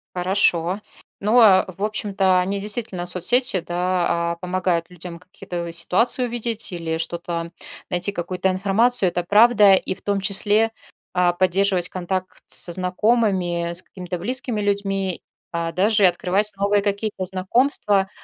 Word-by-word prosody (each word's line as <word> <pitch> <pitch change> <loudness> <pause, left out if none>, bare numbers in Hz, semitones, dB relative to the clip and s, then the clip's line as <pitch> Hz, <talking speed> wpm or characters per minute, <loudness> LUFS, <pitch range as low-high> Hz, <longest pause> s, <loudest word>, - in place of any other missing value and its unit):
Хорошо. 180 0 +1 0.4
Ну, 215 +5 +3
а 195 -4 +6
в 185 +2 -8
общем-то, 200 -3 +1
они 195 +2 -1
действительно 205 -3 -5
соцсети, 190 +5 +2
да, 175 -1 -1
а, - - -3
помогают 180 -1 -1
людям 175 -1 -9
какие-то 175 -1 -7
ситуации 230 +9 +2
увидеть 235 -2 -1
или 165 -2 -3
что-то 170 0 -4 0.4
найти, 180 +3 -1
какую-то 185 0 -2
информацию. 195 +3 +2
Это 175 0 -3
правда. 210 +1 +5
И 190 - -3
в - - -19
том 200 -1 -1
числе, 210 +3 +1 0.4
а, 180 -1 +2
поддерживать 185 0 +1
контакт 185 0 -4
со 175 - 0
знакомыми, 185 -2 0
с 170 - -1
какими-то 180 -1 -7
близкими 240 +2 -3
людьми, 195 -2 -2 0.3
а, 170 -1 -3
даже 205 +4 +2
и - - +8
открывать 185 +4 0
новые 200 +1 +1
какие-то 200 -1 -2
знакомства. 195 +1 +1
190 Hz, 140 wpm, -21 LUFS, 175-205 Hz, 0.4 s, и